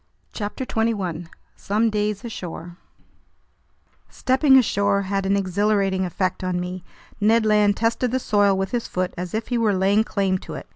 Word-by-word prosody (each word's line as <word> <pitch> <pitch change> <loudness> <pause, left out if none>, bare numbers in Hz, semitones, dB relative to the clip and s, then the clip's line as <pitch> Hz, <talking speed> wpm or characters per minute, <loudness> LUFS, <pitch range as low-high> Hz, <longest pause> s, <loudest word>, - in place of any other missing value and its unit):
CHAPTER 210 +4 -4
21 195 -9 -2 0.3
Some 215 +3 0
Days 210 0 -2
Ashore 175 -5 -7 1.3
STEPPING 265 +1 +3
ASHORE 200 -4 +2
had 195 0 -2
an 200 +1 +2
exhilarating 195 0 +1
effect 185 +1 -2
on 180 -1 -1
me. 180 0 -5 0.4
Ned 220 +2 +3
Land 210 -1 +3
tested 230 +2 0
the 255 - 0
soil 205 -5 +2
with 195 0 -2
his 240 -2 -2
foot, 185 0 -2
as 180 +2 -5
if 220 +1 -3
he 240 -2 0
were 215 -3 +2
laying 195 +3 +3
claim 195 -3 -1
to 160 - -9
it. 135 - -8
200 Hz, 160 wpm, -22 LUFS, 185-220 Hz, 1.3 s, STEPPING